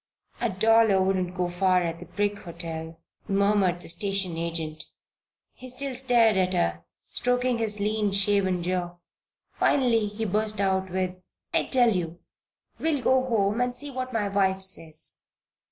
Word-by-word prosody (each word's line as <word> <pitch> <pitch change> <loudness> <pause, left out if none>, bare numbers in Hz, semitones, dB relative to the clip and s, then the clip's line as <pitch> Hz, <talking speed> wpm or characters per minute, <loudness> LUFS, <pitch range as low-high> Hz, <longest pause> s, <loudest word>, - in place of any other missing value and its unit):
"A - - 0
dollar 220 +1 +4
wouldn't 185 -1 0
go 180 -1 0
far 180 0 +2
at 165 -1 -3
the - - -9
Brick 205 0 -2
Hotel," 165 -1 -7 0.3
murmured 195 -3 +2
the - - -9
station 195 0 +1
agent. 165 -2 -3 0.7
He 255 - -8
still 270 +2 -1
stared 240 -4 +3
at 185 0 +1
her, 85 - 0 0.2
stroking 250 -1 0
his 215 -2 0
lean, 210 0 0
shaven 195 -2 +3
jaw. 175 -1 -2 0.6
Finally 235 -6 +3
he 210 +2 -4
burst 215 +1 0
out 190 -1 0
with: 185 0 -2 0.4
"I - - +2
tell 245 -5 +3
you! 170 -2 -3 0.6
We'll 305 -5 0
go 260 0 +3
home 215 -2 +1
and 245 0 -1
see 285 +3 -7
what 255 -1 -4
my 220 -4 -1
wife 190 -1 +1
says." 165 -5 -1
195 Hz, 155 wpm, -26 LUFS, 180-225 Hz, 0.7 s, dollar